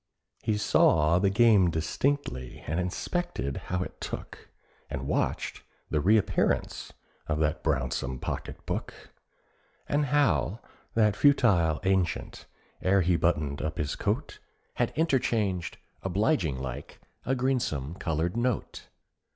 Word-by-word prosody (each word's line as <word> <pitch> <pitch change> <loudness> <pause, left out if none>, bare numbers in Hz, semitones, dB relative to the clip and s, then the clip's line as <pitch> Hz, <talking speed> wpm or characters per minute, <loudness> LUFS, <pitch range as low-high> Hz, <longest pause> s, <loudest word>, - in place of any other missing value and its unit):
He 110 -1 0
saw 85 -5 +4
the 100 +1 +3
game 105 -3 +5
distinctly, 80 - -2
and 80 +3 -1
inspected 90 - -2
how 90 0 0
it - - -10
took, - - -7 0.4
And - - -4
watched - - -1 0.3
the 75 - +1
reappearance 105 +5 +1 0.4
of 75 - 0
that 75 0 0
brownsome 65 -3 -1
pocket - - -5
book, - - -3 0.9
And 145 +1 +1
how 110 - +2 0.4
that 105 -2 +4
futile 105 - +4
ancient, 95 -3 -1 0.3
ere 95 +1 +3
he 90 0 +2
buttoned 75 -4 0
up 80 +1 -3
his 75 -3 -2
coat, - - -2 0.3
Had - - 0
interchanged, 115 - 0 0.2
obliging 95 - +1
like, 65 +2 -6 0.2
a 135 - 0
greensome 120 - -1
coloured 80 +3 -1
note. 120 -1 -2
90 Hz, 120 wpm, -28 LUFS, 75-115 Hz, 0.9 s, game